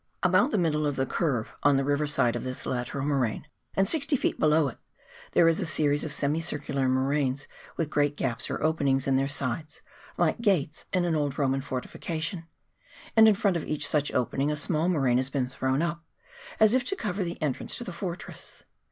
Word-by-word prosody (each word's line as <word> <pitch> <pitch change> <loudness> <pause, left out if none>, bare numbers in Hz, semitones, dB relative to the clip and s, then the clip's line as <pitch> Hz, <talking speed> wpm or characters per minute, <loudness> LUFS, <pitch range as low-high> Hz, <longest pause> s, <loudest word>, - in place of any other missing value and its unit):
About 185 +7 +4
the 250 - 0
middle 155 -4 +1
of 145 - -1
the 130 - 0
curve, 130 -7 -1
on 145 -1 +4
the 135 - +1
river 145 +2 +1
side 120 -5 +2
of - - -3
this 130 0 -5
lateral 130 +2 -3
moraine, 135 -6 0 0.3
and 195 0 +3
60 300 -2 +2
ft. - - -1
below 155 -1 +4
it, 125 - -7 0.5
there 165 - +5
is 165 0 +3
a - - 0
series 145 -2 +2
of 155 - -3
semi 145 +2 0
circular 140 -5 -1
moraines, 135 +1 0 0.3
with 155 -2 -2
great 145 -1 +1
gaps 115 -1 -2
or - - -3
openings 140 -4 +1
in 135 - +2
their 135 +1 +2
sides, 145 +2 -3 0.3
like - - +1
gates 180 -9 0
in 180 -1 +1
an 170 -2 +1
old 145 -3 -1
Roman 135 -1 +1
fortification; 160 +5 -4 0.7
and 220 -1 +8
in 215 - +6
front 195 -3 +1
of 160 - -4
each 150 -1 -2
such 145 -1 +1
opening 135 +4 0
a - - -1
small 160 +3 0
moraine 135 -8 +2
has 130 +1 0
been 135 -2 -1
thrown 130 +3 -1
up, 170 0 -3 0.6
as 220 0 +6
if 255 0 +3
to 390 - -1
cover 205 - -2
the 170 -1 -5
entrance 150 -5 -2
to - - -4
the 185 - -7
fortress. 175 0 -7
150 Hz, 205 wpm, -27 LUFS, 135-170 Hz, 0.7 s, and